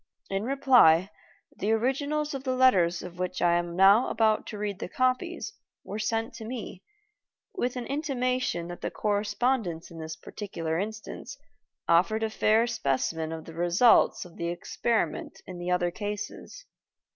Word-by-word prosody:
In 195 +2 -1
reply, 245 - +5 0.5
the 210 - 0
originals 285 +6 0
of 270 -1 -5
the 260 -1 -1
letters 185 -10 +4
of 180 0 -9
which 180 0 -2
I 175 -1 +3
am 175 0 -1
now 195 +6 +6
about 220 -1 +2
to 215 - -6
read 205 -2 -3
the - - -5
copies 255 - -1 0.3
were 210 - -6
sent 225 +1 -1
to - - -9
me, 220 -5 -6 0.7
with 250 -11 -2
an 245 -1 -4
intimation 255 - -1
that 175 - -8
the - - -2
correspondence 205 -4 -1
in 165 - -10
this 160 0 -6
particular 165 -2 -4
instance 220 +6 -6 0.5
offered 205 +6 +3
a 220 - -1
fair 220 +2 +3
specimen 160 - -1
of 160 -1 -6
the 165 - -10
results 175 +9 +4
of 175 - -14
the 170 - -3
experiment 175 +1 -2
in 180 -1 -8
the 175 +1 -4
other 180 -1 +1
cases. 210 - -6
210 Hz, 155 wpm, -28 LUFS, 175-250 Hz, 0.7 s, now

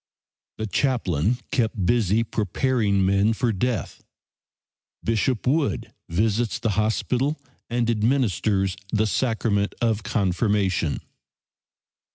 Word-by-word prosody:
The 110 - -3
chaplain 110 - +1
kept 110 -6 0
busy 115 0 +2
preparing 105 -2 +1
men 100 +3 +3
for 115 +1 0
death. 110 -1 -2 1.0
Bishop 115 +2 0
Wood 130 -6 0 0.2
visits 110 +6 +1
the 115 - -1
hospital 125 +7 0 0.3
and 120 0 0
administers 110 -5 +1 0.2
the 110 0 +2
sacrament 110 -3 0
of 115 -2 +1
confirmation. 100 -4 0
110 Hz, 95 wpm, -24 LUFS, 100-120 Hz, 1.0 s, men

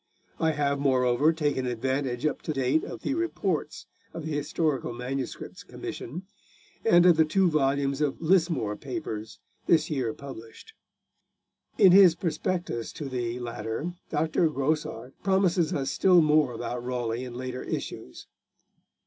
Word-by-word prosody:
I 160 -1 +2
have, 140 -1 0
moreover, 130 +1 +3
taken 145 -5 -1
advantage 130 +2 -2
up 155 - -1
to 155 - -3
date 135 +3 +1
of - - -8
the - - 0
Reports 200 - -2 0.3
of 165 -2 -5
the 160 - -4
Historical 145 -3 -1
MSS. 125 +2 -5
Commission, 165 +10 -7 0.6
and 175 -6 +5
of 175 -3 +6
the 160 - +6
two 180 +3 +2
volumes 140 -1 +1
of 145 -3 0
Lismore 165 - +2
Papers 110 -5 -6 0.3
this 155 -1 +3
year 130 -6 0
published. 115 -5 -11 1.0
In 190 - +7
his 185 -3 +8
prospectus 170 -7 -2
to 145 -4 -6
the 120 -2 -3
latter 120 +6 -4 0.2
Dr. 160 +2 +1
Grosart 135 -4 -2
promises 190 -4 +2
us 135 -1 -1
still 180 -3 +5
more 150 -4 +3
about 120 +1 -4
Raleigh 120 -1 -2
in 125 -2 -7
later 130 0 -5
issues. 65 - -6
145 Hz, 140 wpm, -27 LUFS, 125-160 Hz, 1.0 s, his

